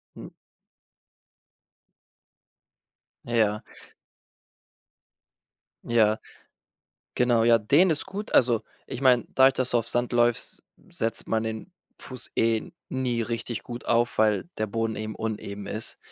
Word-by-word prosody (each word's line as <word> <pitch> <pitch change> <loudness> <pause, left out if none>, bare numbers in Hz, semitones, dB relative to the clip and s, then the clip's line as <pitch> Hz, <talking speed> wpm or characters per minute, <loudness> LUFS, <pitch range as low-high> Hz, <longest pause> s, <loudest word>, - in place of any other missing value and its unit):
Hm. - - -10 2.9
Ja. 110 -3 +1 2.2
Ja. 110 -2 +3 1.0
Genau, 120 -2 +3
ja, 115 0 +5
dehnen 145 - +4
ist 155 - -1
gut. 200 +2 -6
Also, 120 -3 +4 0.2
ich - - -6
meine, 125 -3 +4
dadurch, 130 0 +6
dass 130 -1 -1
du 120 - +3
auf 115 0 -4
Sand 120 +1 -1
läufst, 120 -1 +1 0.3
setzt 115 0 -3
man 110 0 0
den 110 +10 -5 0.3
Fuß 130 -2 -6
eh 115 -1 +1 0.2
nie 125 -3 -1
richtig 115 0 -4
gut 120 0 -8
auf, 120 0 +1
weil 105 -2 +3
der 110 0 -2
Boden 115 +1 -1
eben 110 0 -5
uneben 105 -2 -5
ist. 110 +2 -3
115 Hz, 120 wpm, -26 LUFS, 110-125 Hz, 2.9 s, dadurch